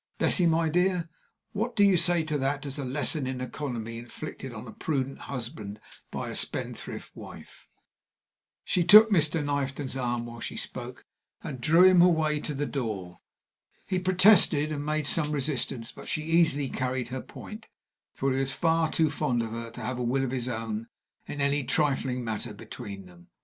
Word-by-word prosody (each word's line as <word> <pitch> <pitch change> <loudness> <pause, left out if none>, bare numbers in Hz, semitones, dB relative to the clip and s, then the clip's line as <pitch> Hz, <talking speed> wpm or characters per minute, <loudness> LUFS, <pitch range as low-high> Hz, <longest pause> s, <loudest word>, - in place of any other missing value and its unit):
Bessie, 180 -3 +4
my 165 0 +2
dear, 180 +1 +1 0.4
what 230 +4 -2
do 205 - +4
you 200 -2 +6
say 170 -1 +3
to 155 -1 -3
that 140 +2 -1
as 140 +1 -4
a - - -2
lesson 135 +2 0
in 130 -1 -3
economy 120 -4 -5
inflicted 130 +2 -8
on 110 +1 -8
a 110 - -9
prudent 135 -1 -2
husband 110 -5 -6 0.3
by - - -4
a - - -6
spendthrift - - -4
wife?" - - -12 1.0
She 180 - +2
took 215 +4 +9
Mr. 155 -4 +2
Knifton's 140 -1 -2
arm 120 -2 -2
while 120 0 -9
she - - -5
spoke, - - -6 0.4
and 130 -4 -6
drew 165 +7 +5
him 185 -1 +7
away 160 -4 +3
to 150 -1 -4
the 145 +2 -1
door. 105 -11 -4 0.7
He 185 -1 -1
protested 180 -5 +5
and 145 -1 -3
made 155 0 -1
some 150 +1 +2
resistance, 135 -5 -2
but - - -10
she 155 - -2
easily 160 -3 +3
carried 125 -2 -2
her 130 0 -4
point, 220 +1 -10 0.5
for 135 0 0
he 130 - 0
was 135 0 -1
far 165 -1 +2
too 160 -2 +2
fond 135 -6 0
of 110 - -5
her 115 0 -5
to - - -9
have 125 0 -3
a - - -1
will 130 +3 +1
of 130 - -2
his 130 -1 -2
own 110 -1 -4 0.4
in 145 - -6
any 140 0 +1
trifling 135 -2 0
matter 110 -1 -4
between 100 -2 -8
them. 85 -1 -17
140 Hz, 180 wpm, -28 LUFS, 120-160 Hz, 1.0 s, took